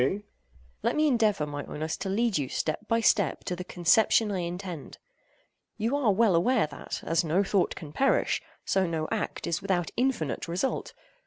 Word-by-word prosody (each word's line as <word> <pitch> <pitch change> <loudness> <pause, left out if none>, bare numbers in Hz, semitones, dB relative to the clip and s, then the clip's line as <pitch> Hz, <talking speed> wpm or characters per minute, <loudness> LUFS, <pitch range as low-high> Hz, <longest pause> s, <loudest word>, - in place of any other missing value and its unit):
AGATHOS. 190 +11 +1 0.6
Let - - 0
me 305 0 +3
endeavor, 215 - +2
my 145 -1 -5
Oinos, 155 +1 -4
to 195 - -3
lead 225 +2 +1
you, 140 -4 0
step 165 +7 -2
by 230 0 +2
step, 200 -5 +2
to 180 - -3
the 180 - -6
conception 210 +5 +3
I 190 - -1
intend. 175 -2 -5 0.8
You 230 +6 0
are 265 -7 +3
well 210 0 +3
aware 230 +6 +3
that, - - -7
as 165 +1 +1
no 170 +5 +2
thought 195 -2 +1
can 150 -2 -9
perish, 270 - +2 0.2
so 190 -1 +2
no 160 -2 -2
act - - -2
is 170 +2 -1
without 185 -4 0
infinite 245 - -1
result. 180 +10 -2
190 Hz, 180 wpm, -28 LUFS, 165-220 Hz, 0.8 s, me